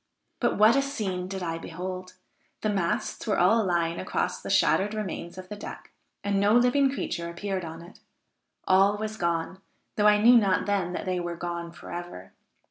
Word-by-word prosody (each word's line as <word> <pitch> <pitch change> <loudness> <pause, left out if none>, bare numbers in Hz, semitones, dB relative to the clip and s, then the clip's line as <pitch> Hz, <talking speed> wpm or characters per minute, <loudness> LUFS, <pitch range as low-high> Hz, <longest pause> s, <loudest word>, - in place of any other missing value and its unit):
But - - +1
what 215 +4 +6
a 275 - +4
scene 200 -10 -3
did 190 -1 -5
I 165 -1 -3
behold! 185 +2 -6 0.5
The 215 - 0
masts 190 +3 -2
were 210 - +1
all 220 +6 +4
lying 170 -3 0
across - - -2
the - - -7
shattered 205 +2 +3
remains 185 -4 -5
of 185 0 -8
the 210 - -7
deck, 205 - -9 0.3
and 200 -1 +1
no 205 +2 +3
living 250 +3 +4
creature 170 -10 -3
appeared 190 +2 -3
on 165 0 -8
it; 175 +4 -15 0.7
all 195 +2 +4
was 215 0 -4
gone, 170 0 -2 0.4
though 210 0 +4
I 210 0 +5
knew 240 +3 +7
not 195 -5 +2
then 195 -3 0
that - - -4
they 185 -1 -1
were 175 -1 -4
gone 170 0 -5
forever. 170 - -8
185 Hz, 185 wpm, -27 LUFS, 175-210 Hz, 0.7 s, knew